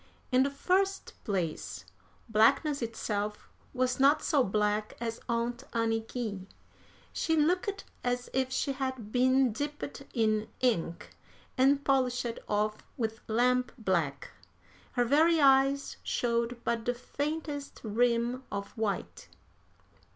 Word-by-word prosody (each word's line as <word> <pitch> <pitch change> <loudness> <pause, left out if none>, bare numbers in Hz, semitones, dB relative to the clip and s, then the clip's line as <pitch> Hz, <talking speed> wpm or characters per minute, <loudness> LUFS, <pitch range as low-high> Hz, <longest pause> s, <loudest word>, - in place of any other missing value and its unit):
In 255 0 +5
the 275 - +3
first 385 +7 0
place, 180 -7 -3 0.4
blackness 275 +7 +3
itself 210 -2 -3 0.2
was 255 0 0
not 280 +3 +5
so 290 -5 +3
black 210 0 0
as 230 -1 -3
Aunt 235 +2 -1
Anniky. 225 -3 -2 0.7
She 325 - +1
looked 360 +6 +1 0.2
as 245 0 -1
if 260 0 0
she 275 +2 0
had 260 -5 -4
been 255 +1 +4
dipped 290 +2 -5
in 215 -2 +2
ink 205 -9 0 0.4
and 275 +2 +4
polished 250 -3 +1
off 210 +1 +1 0.2
with 225 -3 -2
lamp 250 +2 +2
black. 170 - -1 0.6
Her 245 -1 +2
very 315 +6 +4
eyes 275 0 +4
showed 235 0 -1
but 230 -1 -1
the 245 - 0
faintest 290 +2 -4
rim 235 +3 +1
of 200 0 -4
white. 215 -3 -3
245 Hz, 115 wpm, -30 LUFS, 220-275 Hz, 0.7 s, In